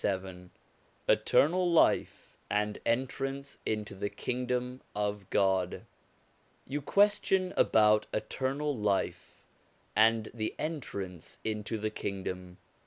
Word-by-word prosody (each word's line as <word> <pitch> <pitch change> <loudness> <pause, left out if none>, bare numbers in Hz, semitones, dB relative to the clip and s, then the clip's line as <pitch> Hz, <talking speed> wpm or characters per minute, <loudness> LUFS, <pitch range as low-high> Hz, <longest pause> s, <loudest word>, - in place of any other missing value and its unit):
LXVII 95 -2 -3 0.6
ETERNAL 175 +4 +4
LIFE 170 - +2
AND 105 0 0
ENTRANCE 135 +3 -2
INTO 105 -2 -2
THE 100 +1 -3
KINGDOM 125 +1 -2
OF 105 -2 -2
GOD 95 -2 +1 0.8
You 145 +3 -3
question 195 +1 +3
about 105 0 +4
eternal 135 +6 -1
life, 105 -3 -1 0.5
and 110 +1 +4
the 110 -2 -3
entrance 100 - -5
into 110 0 -2
the 110 0 -2
Kingdom. 90 -3 -5
110 Hz, 100 wpm, -31 LUFS, 100-135 Hz, 0.8 s, ETERNAL